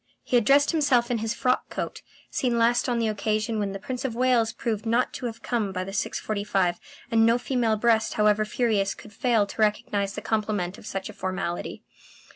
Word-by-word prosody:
He - - -1
had 235 -3 +4
dressed 285 +3 +5
himself 270 -7 +2
in 235 - 0
his 225 +1 -2
frock 255 +1 0
coat, - - -5 0.3
seen 245 -2 0
last 240 +2 +3
on 240 - +1
the 230 -1 +1
occasion 215 +1 -1
when 200 -1 -1
the 195 - -4
Prince 250 +5 -5
of 250 -4 -2
Wales 240 -2 +3
proved 220 -1 -3
not 235 +2 +1
to 245 - -4
have 225 -1 -8
come 225 -5 -1
by 185 -1 -3
the 195 - -7
6.45, 195 -3 -1 0.3
and 225 -1 +4
no 230 +1 +5
female 245 -3 0
breast 225 0 +2
however 210 0 +3
furious 215 -3 0
could 210 - -13
fail 230 -2 +2
to 200 - -6
recognize 205 -1 0
the - - -4
compliment 210 -4 -1
of - - -12
such 195 -3 -4
a - - -9
formality. 185 -2 -4
220 Hz, 205 wpm, -26 LUFS, 205-240 Hz, 0.3 s, dressed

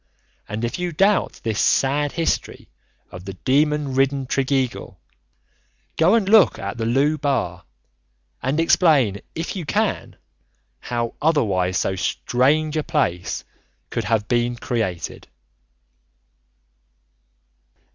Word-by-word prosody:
And 110 +3 -2
if 120 - -4
you 180 -1 -2
doubt 195 +5 +1
this 110 -2 -1
sad 145 +2 +2
history 165 -1 -2 0.4
of 90 0 -9
the 95 - -6
demon 145 +5 +1
ridden 135 0 +1
Tregeagle, 135 -1 -1 1.0
go 175 +7 +4
and 215 -4 +1
look 210 -3 +5
at 100 +4 -5
the 115 - -1
Looe 145 +6 +2
Bar 110 - -1 0.8
and 135 +5 -1
explain 150 - +3
if 165 +4 -4
you 185 - -4
can 145 - -1 0.6
how 120 -1 -3
otherwise 100 - +1
so 95 - 0
strange 145 - +1
a 155 - 0
place 90 - -1 0.5
could - - -2
have 105 0 0
been 120 0 +1
created. 110 - -3
135 Hz, 115 wpm, -22 LUFS, 110-155 Hz, 1.0 s, look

